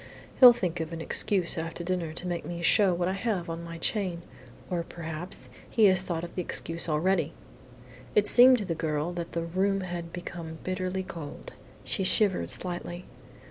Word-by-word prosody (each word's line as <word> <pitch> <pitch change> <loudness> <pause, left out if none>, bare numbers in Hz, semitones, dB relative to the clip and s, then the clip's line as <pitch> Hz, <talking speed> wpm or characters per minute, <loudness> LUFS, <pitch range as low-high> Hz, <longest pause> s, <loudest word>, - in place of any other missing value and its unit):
"He'll 250 -2 +11
think 180 -7 -2
of 160 0 -4
an 165 - -5
excuse 175 +1 +1
after 165 +1 -5
dinner 175 -2 -2
to 170 +3 -7
make 175 -2 -3
me 170 0 -6
show 200 +1 +4
what 175 0 0
I 185 - 0
have 195 -5 -2
on 165 +1 -5
my 165 0 -7
chain, 180 -1 -2 0.4
or 175 -2 -1
perhaps 165 +1 -7 0.2
he 220 - +4
has 190 -2 +5
thought 170 -3 -3
of 170 - -7
the 180 - -2
excuse 165 -1 -2
already!" 165 0 +1 0.8
It 210 - +5
seemed 250 +1 +8
to 210 - -4
the 175 - -1
girl 155 +1 -2
that 170 -1 -5
the 170 - -1
room 195 +4 0
had 175 -2 -5
become 170 -2 -7
bitterly 185 0 -2
cold. 160 -5 -8 0.3
She 195 - -1
shivered 195 0 +3
slightly. 175 0 -4
175 Hz, 180 wpm, -28 LUFS, 165-190 Hz, 0.8 s, He'll